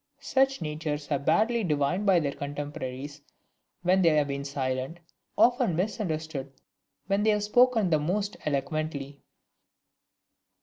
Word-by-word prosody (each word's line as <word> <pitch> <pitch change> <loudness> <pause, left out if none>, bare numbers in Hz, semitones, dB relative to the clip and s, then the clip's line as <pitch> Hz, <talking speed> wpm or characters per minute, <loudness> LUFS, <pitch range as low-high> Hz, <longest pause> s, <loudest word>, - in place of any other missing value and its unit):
Such 270 -7 +1
natures 150 -1 -3
are 140 - +2
generally 140 - -13
badly 220 +8 +2
divined 160 +4 0
by 185 -3 +6
their 145 -3 -1
contemporaries 145 -1 -6 0.6
when 185 +2 +3
they 170 - +5
have 150 -2 +2
been 140 0 -3
silent, 135 +2 -3 0.4
often 245 -7 +4
misunderstood 160 -7 -3 0.5
when 195 +1 +1
they 215 - +3
have 210 -1 +2
spoken 225 -3 +3
the 155 - +4
most 200 +7 -1
eloquently! 145 -1 -3
155 Hz, 130 wpm, -28 LUFS, 140-200 Hz, 0.6 s, by